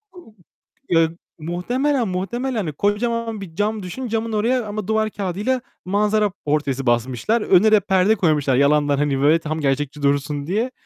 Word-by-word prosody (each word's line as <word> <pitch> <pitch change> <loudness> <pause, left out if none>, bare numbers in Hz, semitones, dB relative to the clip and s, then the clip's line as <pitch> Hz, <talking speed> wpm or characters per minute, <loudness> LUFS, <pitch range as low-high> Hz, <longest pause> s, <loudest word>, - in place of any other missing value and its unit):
ııı, 340 -12 -15 0.6
eee, 165 -1 +4 0.3
muhtemelen, 240 - -1
muhtemelen 235 +8 -3
hani, 165 -8 -2
kocaman 225 +3 -1
bir 165 -4 -9
cam 210 0 -1
düşün, 245 +8 -5
camın 225 0 -2
oraya 235 +3 +1
ama 210 -1 -5
duvar 220 0 +1
kağıdıyla 205 +7 -2 0.2
manzara 210 +1 +1
portresi 140 -3 -1
basmışlar. 125 - +1
Önüne 205 +3 +4
de 215 - +6
perde 190 +3 +2
koymuşlar 150 -8 +1
yalandan 145 +1 +3
hani 140 -2 0
böyle 155 +3 +4
tam 155 0 -4
gerçekçi 145 +1 -1
dursun 140 +1 0
diye. 210 +6 +1
Eee, 255 - -5
190 Hz, 160 wpm, -21 LUFS, 150-220 Hz, 0.6 s, de